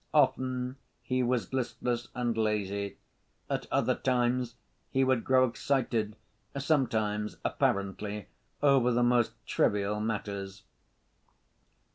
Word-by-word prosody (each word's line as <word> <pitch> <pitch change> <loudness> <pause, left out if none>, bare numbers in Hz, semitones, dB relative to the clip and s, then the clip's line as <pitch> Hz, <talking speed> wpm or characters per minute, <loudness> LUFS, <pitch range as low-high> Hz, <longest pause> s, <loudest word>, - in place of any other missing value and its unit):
Often 130 -2 +2 0.3
he 130 0 0
was 125 0 0
listless 120 -2 -1
and 120 -2 0
lazy, 100 -2 -1 0.5
at - - -1
other - - +3
times 125 -1 +1 0.3
he 135 - +2
would 130 -3 +2
grow 130 0 +5
excited, 115 -4 0 0.4
sometimes, 110 -8 0
apparently, 100 +1 -1 0.4
over 135 -4 +5
the 120 0 +3
most 120 -1 +3
trivial 105 +1 +1
matters. 100 -2 -3
120 Hz, 100 wpm, -30 LUFS, 105-130 Hz, 0.5 s, grow